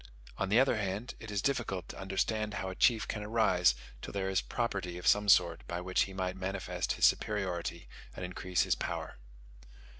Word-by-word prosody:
On 95 - 0
the 110 +4 +5
other 130 -3 +3
hand, 100 +3 -3
it 115 - -9
is 100 -1 -2
difficult 110 -10 -1
to - - -8
understand 105 +2 -1
how 95 - -3
a 95 - -6
chief 115 +1 +3
can 105 - -3
arise 105 - +3 0.3
till - - -6
there 95 -1 -2
is 95 - +2
property 100 -7 -3
of 90 - -8
some 105 0 +4
sort 85 -3 +5
by 85 - -3
which 90 +1 +1
he 95 - -9
might 95 -1 -2
manifest 95 -2 -2
his - - +3
superiority 90 -5 0 0.3
and 90 - -4
increase 90 0 0
his - - +2
power. - - -4
95 Hz, 190 wpm, -32 LUFS, 90-105 Hz, 0.3 s, the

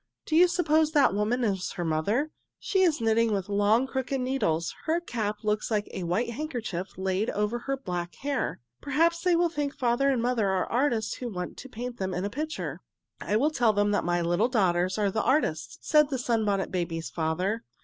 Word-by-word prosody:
"Do 310 - -1
you 355 +2 +7
suppose 315 -3 +2
that 285 - +4
woman 215 +5 0
is 195 -4 -1
her 175 - -3
mother? 205 - 0 0.3
She 385 - 0
is 325 -8 +3
knitting 225 0 +3
with 200 -1 -2
long, 205 +5 +3
crooked 265 0 -2
needles. 250 -11 0
Her 330 +1 +2
cap 215 -9 -3
looks 210 0 0
like 210 -2 0
a - - -5
white 225 +8 0
handkerchief 235 - -4
laid 190 +3 0
over 210 +3 -1
her 275 +3 -2
black 180 -8 -4
hair. 280 -2 -2 0.2
Perhaps 330 +4 +2
they 360 -2 +3
think 290 -3 -3
father 250 +2 +2
and 265 -3 +2
mother 235 -3 +1
are 190 -1 +1
artists 240 -3 0
who 245 - -4
want 180 -4 -5
to 265 - -9
paint 245 +1 -6
them 190 -1 -2
in 180 +2 -2
a 200 - -3
picture." 310 +5 -4 0.4
"I 210 - -1
will 285 +8 +3
tell 240 -7 +3
them 205 0 +2
that 205 - +1
my 175 0 0
little 175 +8 +2
daughters 185 -5 +1
are 205 -2 +1
the 220 - 0
artists," 260 - 0
said 300 -2 +5
the 270 - -1
Sunbonnet 220 -5 0
Babies' 170 -2 -3
father. 180 +7 -1
225 Hz, 200 wpm, -27 LUFS, 190-270 Hz, 0.4 s, you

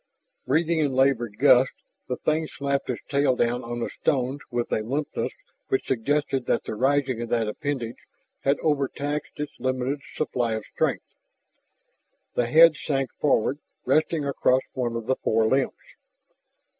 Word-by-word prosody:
Breathing 160 +3 +2
in 145 -4 +1
labored 125 -5 +2
gusts, 130 0 +5 0.3
the 125 - -1
thing 155 +1 0
slapped 140 -2 -2
its 125 - -3
tail 140 -2 +2
down 120 +1 0
on 120 0 -4
the - - -2
stones 135 -1 +1
with 120 -1 -2
a - - +1
limpness 140 +7 -2 0.4
which 395 -1 0
suggested 135 +1 0
that - - +1
the - - -5
raising 130 +1 +1
of 120 - -4
that 115 -2 +1
appendage 125 0 -3 0.4
had 140 +1 +1
overtaxed 145 0 -1
its 150 -1 -4
limited 130 +2 -1
supply 120 -6 -1
of 110 -1 -4
strength. - - 0 1.3
The 120 - +1
head 160 +4 +7
sank 135 -3 -2
forward, 140 -1 +2 0.3
resting 155 -1 +2
across 130 -2 +2
one 120 -3 -2
of 115 -1 -4
the 130 +2 +1
forelimbs. 115 +4 +1
130 Hz, 145 wpm, -25 LUFS, 120-145 Hz, 1.3 s, head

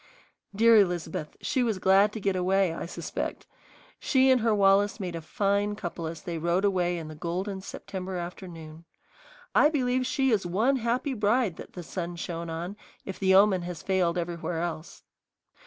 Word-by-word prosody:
Dear 230 +2 +6
Elizabeth, 175 -6 0
she 260 - 0
was 225 -5 0
glad 195 +2 +4
to 220 - -5
get 195 -1 0
away, 185 -1 +2
I 165 - -5
suspect! - - -5 0.5
She 265 0 +3
and 255 -2 +4
her 220 -1 +2
Wallace 200 +1 +3
made 180 -3 -4
a 165 - -5
fine 200 +5 0
couple 175 -4 -5
as 165 0 -7
they 170 -2 -4
rode 170 +4 +1
away 180 -3 +1
in 160 -2 -6
the 155 - -8
golden 185 +5 -4
September 190 -1 -6
afternoon. 170 -2 -8 0.7
I 295 - +6
believe 255 -4 0
she 265 0 +1
is 210 -4 +2
one 215 +10 +1
happy 250 +4 -1
bride 215 -4 +1
that - - -10
the 180 - -7
sun 175 0 -5
shone 170 -1 -5
on, 170 +5 -5 0.3
if 190 - -6
the 190 -1 +4
omen 195 -2 +5
has 175 -2 -6
failed 185 -2 +1
everywhere 170 -1 -3
else. 165 -2 -6
190 Hz, 175 wpm, -27 LUFS, 170-210 Hz, 0.7 s, Dear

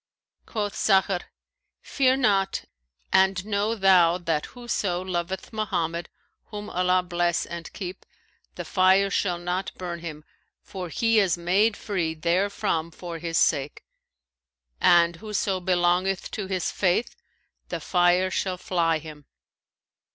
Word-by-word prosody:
Quoth 205 -2 -3
Sakhr, 190 -2 +2 0.6
'Fear 260 -1 +2
not, 195 -6 +1 0.5
and 190 0 +3
know 210 +1 0
thou 185 -4 +5
that 165 -4 -2
whoso 215 -7 -2
loveth 185 +3 -4
Mohammed 175 -6 -2 0.4
(whom 210 -1 -8
Allah 180 0 +2
bless 175 -1 0
and 170 -1 -7
keep!) 185 -2 -7 0.5
the - - -6
fire 190 +1 +3
shall 180 -4 0
not 180 +2 -3
burn 175 -2 -5
him, 155 -3 -7 0.4
for 185 -3 -7
he 225 +4 +2
is 185 -5 +2
made 195 +5 +2
free 170 -6 -2
therefrom 170 0 0
for 170 0 -8
his 165 0 -2
sake; 145 -2 +1 1.0
and 170 -1 +4
whoso 205 -1 -2
belongeth 180 +1 +1
to 205 -3 -4
his 185 -2 -1
Faith 190 +5 0 0.5
the - - -3
fire 180 +1 +2
shall 185 -1 -1
fly 175 -4 +1
him. 150 -2 -11
185 Hz, 125 wpm, -25 LUFS, 170-195 Hz, 1.0 s, thou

